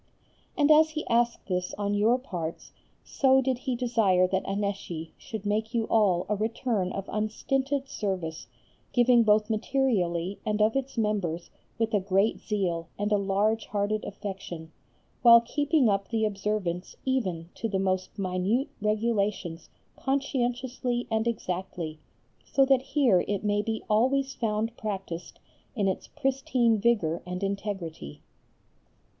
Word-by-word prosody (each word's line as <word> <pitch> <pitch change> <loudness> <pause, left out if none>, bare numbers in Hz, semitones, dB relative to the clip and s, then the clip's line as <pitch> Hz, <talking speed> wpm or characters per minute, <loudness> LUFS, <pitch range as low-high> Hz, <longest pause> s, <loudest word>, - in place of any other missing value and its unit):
And 295 0 +4
as 310 +1 +7
he 310 0 -4
asked 235 0 +1
this 180 -1 -2
on 205 0 -1
your 215 +4 +3
parts 175 -11 -6 0.3
so 265 -1 +3
did 260 -1 0
he 260 -1 -2
desire 225 -7 +3
that 190 0 -1
Annecy 195 -5 -3
should 215 -3 -7
make 220 +3 -1
you 230 - +2
all 195 -6 +3
a 210 - +1
return 215 -2 -1
of 195 0 -5
unstinted 270 +6 -1
service, 185 -9 -3 0.5
giving 245 -1 +5
both 210 -1 +4
materially 205 -7 0
and 210 0 -1
of 215 +2 +3
its 270 -1 -2
members 195 -6 -1 0.3
with 225 0 0
a 205 - +4
great 195 +3 +1
zeal 180 -6 -2
and 205 +1 -1
a 210 - +4
large 205 +3 +1
hearted 210 +1 -1
affection, 190 -5 -7 0.5
while 235 -1 +9
keeping 290 +3 +1
up 200 -1 +1
the 225 -2 +1
observance 195 -3 -2
even 185 -11 -1
to 225 - -3
the 195 - 0
most 185 0 -1
minute 195 +7 0
regulations 210 -6 -1 0.3
conscientiously 250 -2 -1
and 220 +1 +1
exactly, 180 -7 -3 0.4
so 275 - +3
that 265 -1 +4
here 270 - +3
it 200 0 -1
may 205 0 +2
be 220 +1 -3
always 265 +5 +2
found 225 0 -1
practised 195 -5 -5 0.4
in 205 -4 +1
its 190 - -2
pristine 260 -5 +1
vigour 195 -8 +1
and 180 +2 -5
integrity. 195 - -4
210 Hz, 140 wpm, -28 LUFS, 190-240 Hz, 0.5 s, while